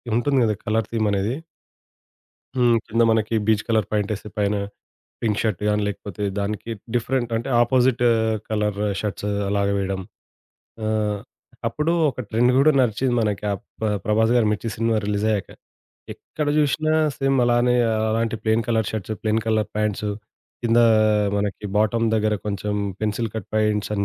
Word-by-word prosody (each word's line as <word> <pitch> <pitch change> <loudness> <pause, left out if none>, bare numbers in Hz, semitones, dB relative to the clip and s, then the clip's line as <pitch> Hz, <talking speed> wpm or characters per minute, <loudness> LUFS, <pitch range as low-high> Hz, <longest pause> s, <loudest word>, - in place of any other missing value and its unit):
ఉంటుంది 135 +3 +2
గదా! 105 -1 +1
కలర్ 110 0 +1
థీమనేది 105 -1 0 1.2
హ్మ్. 120 -2 +4
కింద 115 +2 +2
మనకి 110 0 +1
బీజ్ 110 -1 +3
కలర్ 110 -4 +2
ప్యాంట్ 105 -1 0
ఏసి, 105 +1 -9
పైన 105 0 +1 0.7
పింక్ 105 -3 0
షర్ట్ 105 -5 -1
గానీ, 105 0 +2
లేకపోతే 100 -1 -5 0.2
దానికి 105 +3 -3 0.2
డిఫరెంట్ 120 0 0
అంటే, 120 +4 -3
ఆపోజిటు 125 0 +3 0.4
కలరు 105 -1 -1 0.2
షర్ట్స్ 105 -1 -3 0.2
అలాగా 100 0 +1
వేయడం. 95 -1 -2 0.8
ఆహ్, 105 -1 0 0.5
అప్పుడు 150 +2 -1 0.2
ఒక 130 - -8
ట్రెండు 120 +3 +3
గూడా 145 +3 +6
నడిచింది 125 +2 +1
మనకి 105 -2 -1
అప్పుడు 95 - -9
ప్ 105 -3 0
'ప్రభాస్' 110 +2 +3
గారి 115 -3 +4
'మిర్చి' 105 +2 -2
సినిమా 115 0 +1
రిలీజ్ 105 0 -1
అయ్యాక, 100 -3 -2 0.7
ఎక్కడ 150 - -5
జూసినా 155 +1 +2 0.2
సేమ్ 135 -1 +1
అలానే 120 +1 +3 0.2
ఆహ్, 110 0 0
అలాంటి 115 0 0
plain 110 +1 +1
colour 110 -2 +1
shirts, 110 0 -3
plain 110 0 +1
colour 110 -1 +1
pants, 105 -1 -1 0.5
కిందా 120 0 +5 0.5
మనకి 100 0 -2
బాటమ్ 110 +2 +2
దగ్గర 110 -1 +1
కొంచెం 105 0 -2 0.3
పెన్సిల్ 110 +1 -1
కట్ 110 -4 -5
ప్యాంట్స్ 105 -1 +1
అని 100 -1 0
110 Hz, 150 wpm, -23 LUFS, 105-115 Hz, 1.2 s, గూడా